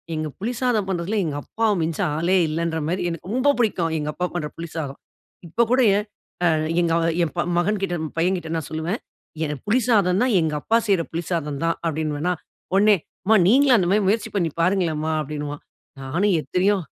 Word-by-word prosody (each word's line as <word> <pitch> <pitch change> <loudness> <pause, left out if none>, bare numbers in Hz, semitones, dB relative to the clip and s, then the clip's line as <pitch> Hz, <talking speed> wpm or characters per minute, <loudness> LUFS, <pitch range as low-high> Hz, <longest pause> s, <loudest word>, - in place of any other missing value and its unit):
எங்க 155 0 -2
புளி 225 +5 -2
சாதம் 230 -6 +1
பண்றதில 190 +3 -1
எங்கப்பாவ 160 +9 -1
மிஞ்ச 160 0 -2 0.2
ஆளே 170 +4 +2
இல்லன்ற 165 +1 -1
மாரி, 180 +3 -1
எனக்கு 170 +2 -7
ரொம்ப 260 +3 +2
பிடிக்கும் 175 -8 +1
எங்கப்பா 150 +4 -2
பண்ற 155 -4 -1
புளி 170 0 -5
சாதம். 140 -4 -4 0.5
இப்ப 170 +9 0
கூட 260 - +4 0.6
அ - - +5 0.3
எங்க 170 -1 +1 0.3
என் 165 - -1 0.3
மகன்கிட்ட 195 0 0 0.2
பையங்கிட்ட 175 0 0
நான் 160 -4 -3
சொல்லுவே 160 +3 -2 0.5
எனக்கு 150 -3 -3
புளி 230 +5 +3
சாதம்னா 205 -1 +3
எங்கப்பா 155 +8 +1
செய்ற 190 -5 +3
புளி 170 +1 -3
சாதம் 150 -5 -2
தான் 165 0 +1
அப்படினுவேனா. 155 +1 -1 0.4
உடனே 205 +2 +5 0.3
அம்மா 220 +2 +5
நீங்களும் 260 +3 +5
அந்த 180 -4 +1
மாரி 205 +1 +3
முயற்சி 215 +3 0
பண்ணி 170 -5 +1
பாருங்களேன்மா 165 -4 +1
அப்படினுவான். 145 0 -5 0.4
நானும் 175 +9 +1
எத்தனையோ 195 +5 +1
175 Hz, 160 wpm, -23 LUFS, 160-205 Hz, 0.6 s, அ